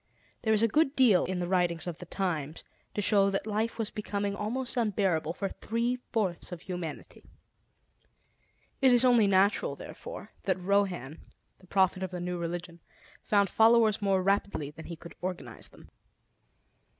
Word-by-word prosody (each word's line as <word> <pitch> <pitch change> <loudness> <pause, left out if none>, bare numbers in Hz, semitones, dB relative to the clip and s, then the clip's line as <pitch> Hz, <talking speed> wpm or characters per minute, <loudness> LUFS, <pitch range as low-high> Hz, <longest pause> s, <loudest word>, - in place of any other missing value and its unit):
There 220 -2 +2
is 215 - +3
a - - +5
good 300 +4 +2
deal 235 -9 +5
in 185 0 -3
the 175 -1 -2
writings 175 -3 +1
of 175 -3 -5
the 180 - -9
times 165 -6 -3 0.3
to 205 - 0
show 200 -1 +4
that 195 +1 -2
life 220 +2 -1
was 225 -2 -2
becoming 205 -1 -3
almost 240 +5 -3
unbearable 195 -8 0
for 195 +2 -3
three 235 +5 -2 0.2
fourths 190 -7 -1
of 175 -2 -7
humanity. 175 -5 -7 1.6
It 265 -1 +6
is 245 +1 +6
only 240 -4 +5
natural, 195 +1 +2
therefore, - - -9
that - - +1
Rohan, 180 -6 0 0.4
the 185 - -20
prophet 190 0 +2
of 190 - -2
the 180 0 -6
new 175 0 -3
religion, 170 0 -5 0.4
found 200 -1 +2
followers 225 -1 +4
more 195 -2 +2
rapidly 195 -6 0
than 160 +1 -11
he 170 - -6
could 170 +1 -12
organize 180 -1 -6
them. - - -17
195 Hz, 160 wpm, -29 LUFS, 175-220 Hz, 1.6 s, It